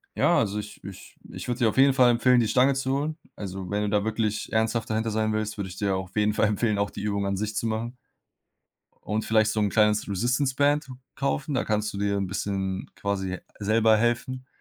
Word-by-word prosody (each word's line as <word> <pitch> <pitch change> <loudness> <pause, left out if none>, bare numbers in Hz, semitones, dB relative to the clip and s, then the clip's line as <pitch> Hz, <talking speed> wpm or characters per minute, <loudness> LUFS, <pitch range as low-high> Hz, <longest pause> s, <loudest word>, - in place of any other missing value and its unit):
ja, - - +3
also, 105 -1 -1
ich 105 0 -9
ich 100 -2 -11
ich - - -7
würde 120 +1 -2
dir 115 -2 +4
auf - - -6
jeden 135 0 +6
Fall 125 -2 +5
empfehlen, 125 +1 +4
die 115 - +2
Stange 130 +5 +4
zu 130 0 -2
holen. 155 +2 -3 0.2
Also, 95 -2 -6
wenn 105 +1 -1
du 105 - -1
da 100 0 +1
wirklich 110 -1 -2
ernsthaft 110 +1 0
dahinter 110 0 -1
sein 110 0 0
willst, 110 0 -2
würde 95 -2 -4
ich 90 - -9
dir 100 -2 0
auf 95 -1 -7
jeden 105 0 +2
Fall 105 - +2
empfehlen, 105 0 0
auch 100 0 0
die - - -8
Übung 100 -1 -1
an 100 - 0
sich 105 +1 -3
zu 115 - -1
machen. 115 +3 -3 1.1
Und 110 +1 -1
vielleicht 110 -1 +3
so 110 - -1
'n 105 -1 +1
kleines 105 -1 +2
Resistance 125 +7 0
Band 145 +1 +2 0.3
kaufen. 140 +1 -2
Da 125 - 0
kannst 105 0 -1
du 100 - -6
dir 100 0 0
'n 95 - -1
bisschen 95 0 -3
quasi 95 -2 -2 0.2
selber 110 +1 +3
helfen 120 +3 -1
110 Hz, 225 wpm, -26 LUFS, 100-120 Hz, 1.1 s, jeden